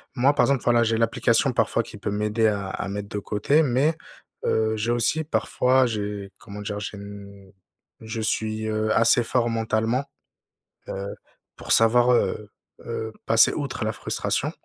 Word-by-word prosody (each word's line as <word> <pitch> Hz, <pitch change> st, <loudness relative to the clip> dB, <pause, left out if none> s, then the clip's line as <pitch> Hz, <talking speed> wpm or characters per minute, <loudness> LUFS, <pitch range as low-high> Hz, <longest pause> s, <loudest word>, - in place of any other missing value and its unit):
moi, 135 Hz, +3 st, +3 dB
par -, -, +3 dB
exemple, 140 Hz, -2 st, +1 dB
voilà, 120 Hz, -1 st, +3 dB
j'ai 115 Hz, 0 st, +1 dB
l'application 115 Hz, 0 st, +2 dB
parfois -, -, +1 dB
qui -, -, -11 dB
peut -, -, -3 dB
m'aider 105 Hz, +2 st, +1 dB
à 100 Hz, -2 st, -1 dB
à 95 Hz, -, -4 dB
mettre 100 Hz, +1 st, -5 dB
de 105 Hz, -, -3 dB
côté 105 Hz, +10 st, +1 dB
mais, 140 Hz, +3 st, +2 dB, 0.5 s
heu, 110 Hz, 0 st, +1 dB
j'ai 110 Hz, +2 st, -1 dB
aussi 120 Hz, +7 st, +1 dB
parfois, 130 Hz, -3 st, +2 dB
j'ai 105 Hz, -3 st, -4 dB
comment 105 Hz, -1 st, -9 dB
dire? 105 Hz, 0 st, -4 dB
J'ai 105 Hz, 0 st, -6 dB, 1.0 s
je 110 Hz, 0 st, -5 dB
suis, 110 Hz, 0 st, -2 dB
heu, 110 Hz, 0 st, -1 dB
assez 115 Hz, +1 st, +4 dB
fort 120 Hz, 0 st, 0 dB
mentalement, 115 Hz, +3 st, 0 dB, 0.9 s
heu, 100 Hz, +1 st, -5 dB, 0.4 s
pour -, -, -7 dB
savoir, 120 Hz, +2 st, +5 dB
heu 105 Hz, -3 st, 0 dB, 0.4 s
heu, 110 Hz, -1 st, -4 dB
passer 115 Hz, 0 st, +5 dB
outre 140 Hz, -6 st, -3 dB
la 110 Hz, -, -1 dB
frustration -, -, -2 dB
110 Hz, 160 wpm, -24 LUFS, 105-120 Hz, 1.0 s, savoir